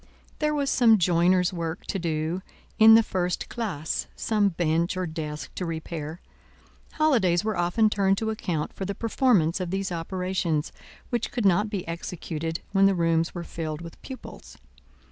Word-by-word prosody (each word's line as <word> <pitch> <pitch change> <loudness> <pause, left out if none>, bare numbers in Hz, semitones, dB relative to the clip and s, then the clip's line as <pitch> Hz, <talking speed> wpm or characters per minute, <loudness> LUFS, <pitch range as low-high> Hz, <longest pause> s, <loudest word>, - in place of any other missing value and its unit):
There 300 0 +1
was 280 -2 0
some 230 -3 +5
joiners' 180 +1 +3
work 170 0 -4
to 195 - -3
do 165 +1 -2 0.4
in 220 0 +9
the 225 - +6
first 180 -3 -2
classe, 185 -10 -3
some 210 -2 +1
bench 170 0 0
or 185 - -1
desk 155 -2 -5
to - - -4
repair; 160 -1 -5 0.7
holidays 225 - +3
were 215 -1 -1
often 175 +6 +2
turned 195 -2 +2
to 220 +1 -1
account 175 -8 -3
for - - -6
the 200 +1 -3
performance 210 - +2
of 180 -2 -3
these 195 0 -2
operations, 175 -2 -2 0.4
which 240 -2 -1
could 240 -4 -2
not 200 +3 +3
be 200 -5 -4
executed 165 -1 -4
when 195 -1 +5
the 195 - +2
rooms 165 0 +1
were 175 - -4
filled 160 -2 -5
with 170 -1 -10
pupils. 260 -1 -10
180 Hz, 165 wpm, -26 LUFS, 165-210 Hz, 0.7 s, in